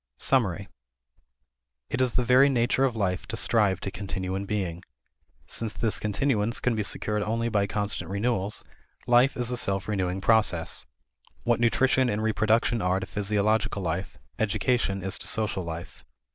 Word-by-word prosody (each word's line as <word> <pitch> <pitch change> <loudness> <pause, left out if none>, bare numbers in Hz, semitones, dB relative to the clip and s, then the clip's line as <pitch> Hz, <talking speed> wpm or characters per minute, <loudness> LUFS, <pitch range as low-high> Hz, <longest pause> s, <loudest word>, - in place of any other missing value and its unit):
Summary. 100 -7 +1 1.2
It 130 - 0
is 125 -2 +2
the 125 - +1
very 130 +3 +5
nature 130 +1 +2
of 125 -3 -1
life 95 -4 -1
to 115 - -3
strive 105 -5 +2
to 95 - -4
continue 95 -2 -4
in 100 +1 -3
being. 90 -5 -2 0.6
Since 110 -2 -4
this 115 -2 -1
continuance 110 +1 0
can 125 - 0
be 110 - -1
secured 105 +1 -1
only 115 +3 -1
by 100 -3 +1
constant 105 -1 0
renewals, 100 0 -1 0.4
life 125 +3 +4
is 125 -1 0
a 125 - -1
self 100 -4 -1
renewing 95 -3 -1
process. 100 -5 +1 0.6
What 120 -1 +1
nutrition 130 +2 +3
and 105 0 -1
reproduction 110 +1 +1
are 90 +1 +1
to 95 - -5
physiological 105 0 0
life, 90 +2 -3 0.2
education 110 -2 0
is 95 0 -2
to - - -2
social 105 -3 0
life. 85 0 -8
105 Hz, 160 wpm, -26 LUFS, 95-120 Hz, 1.2 s, very